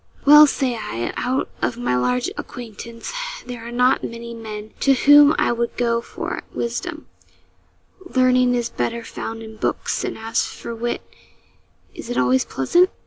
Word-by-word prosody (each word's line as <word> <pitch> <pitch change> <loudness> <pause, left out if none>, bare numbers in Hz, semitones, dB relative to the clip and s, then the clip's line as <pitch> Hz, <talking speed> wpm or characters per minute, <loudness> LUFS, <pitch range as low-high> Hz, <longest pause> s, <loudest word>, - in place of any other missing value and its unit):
Well, 300 +1 +9
say 265 -3 0
I, 120 - -4
out 255 +2 -1
of 240 - -1
my 240 - 0
large 125 0 0
acquaintance, 230 - -8 0.3
there 245 -2 -7
are - - -7
not 250 +2 +3
many 235 0 -6
men 215 -2 -8
to 275 - +4
whom 290 +3 +7
I - - +2
would 235 0 -2
go 235 -1 +1
for - - -5
wisdom; 310 +8 -4 1.0
learning 255 -6 +3
is 240 -1 0
better 235 0 -3
found 225 0 -6
in 220 0 -10
books, - - -1
and, - - -3
as 225 +1 0
for 235 - -7
wit, 240 +1 -3 0.9
is - - -9
it 245 - -2
always 125 +1 +3
pleasant? 350 - +3
235 Hz, 155 wpm, -21 LUFS, 225-255 Hz, 1.0 s, Well